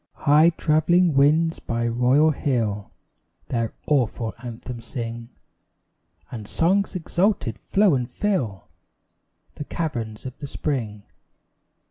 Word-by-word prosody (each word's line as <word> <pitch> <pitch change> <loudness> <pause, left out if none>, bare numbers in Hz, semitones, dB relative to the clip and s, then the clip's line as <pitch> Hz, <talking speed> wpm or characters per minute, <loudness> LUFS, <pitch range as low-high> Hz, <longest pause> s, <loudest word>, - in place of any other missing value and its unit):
High 150 +3 +6
travelling 165 +1 +2
winds 155 +4 +3
by 115 0 -2
royal 125 +6 +3
hill 115 -8 -1 0.6
Their 115 -2 0 0.2
awful 120 -5 0
anthem 120 0 -7
sing, 115 -1 -6 1.0
And 110 -4 -7
songs 190 - +1
exalted 180 - 0
flow 200 -3 +3
and 125 -3 -1
fill 130 - -2 0.9
The - - -6
caverns 120 -10 -4
of 130 0 -8
the 145 - -6
spring. 115 -8 -3
130 Hz, 105 wpm, -23 LUFS, 115-160 Hz, 1.0 s, High